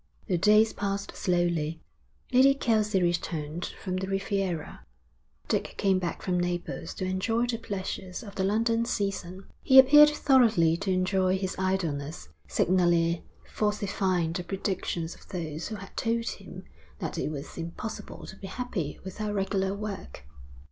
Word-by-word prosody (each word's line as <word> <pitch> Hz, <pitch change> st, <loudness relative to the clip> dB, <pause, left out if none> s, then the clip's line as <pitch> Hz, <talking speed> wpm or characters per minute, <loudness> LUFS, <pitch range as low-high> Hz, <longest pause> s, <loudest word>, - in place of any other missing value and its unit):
The 180 Hz, -5 st, 0 dB
days 215 Hz, +3 st, +5 dB
passed 200 Hz, -1 st, -3 dB
slowly. 170 Hz, -3 st, 0 dB, 0.5 s
Lady 270 Hz, +2 st, +6 dB
Kelsey 215 Hz, -7 st, +2 dB
returned 170 Hz, -2 st, -2 dB, 0.2 s
from 185 Hz, -2 st, -2 dB
the 190 Hz, +1 st, -3 dB
Riviera. 195 Hz, -4 st, -2 dB, 0.6 s
Dick -, -, -1 dB
came 195 Hz, -2 st, +3 dB
back 175 Hz, -2 st, -4 dB
from 180 Hz, -1 st, 0 dB
Naples 175 Hz, -1 st, -3 dB
to 185 Hz, -, -3 dB
enjoy 225 Hz, +6 st, 0 dB
the 235 Hz, -2 st, -2 dB
pleasures 190 Hz, -1 st, -5 dB
of 200 Hz, -3 st, -9 dB
the 195 Hz, -, -1 dB
London 230 Hz, +3 st, +2 dB
season. 195 Hz, -4 st, -3 dB, 0.2 s
He 265 Hz, -, +5 dB
appeared 295 Hz, +3 st, +9 dB
thoroughly 235 Hz, -, +4 dB
to 195 Hz, +2 st, -3 dB
enjoy 185 Hz, 0 st, +2 dB
his 190 Hz, -1 st, -3 dB
idleness, 160 Hz, -, -2 dB, 0.2 s
signally 170 Hz, -2 st, +2 dB, 0.2 s
falsifying 190 Hz, -5 st, 0 dB
the 180 Hz, 0 st, -3 dB
predictions 180 Hz, -2 st, -3 dB
of -, -, -17 dB
those 165 Hz, -4 st, -4 dB
who 220 Hz, -, -5 dB
had 195 Hz, -1 st, -10 dB
told 230 Hz, 0 st, 0 dB
him -, -, -9 dB, 0.3 s
that -, -, -4 dB
it -, -, -1 dB
was 145 Hz, -2 st, -7 dB
impossible 185 Hz, +6 st, -6 dB
to -, -, -9 dB
be 195 Hz, -, -8 dB
happy 190 Hz, -, -4 dB
without 210 Hz, +3 st, -4 dB
regular 195 Hz, 0 st, 0 dB
work. 200 Hz, -, -7 dB
190 Hz, 145 wpm, -28 LUFS, 175-210 Hz, 0.6 s, appeared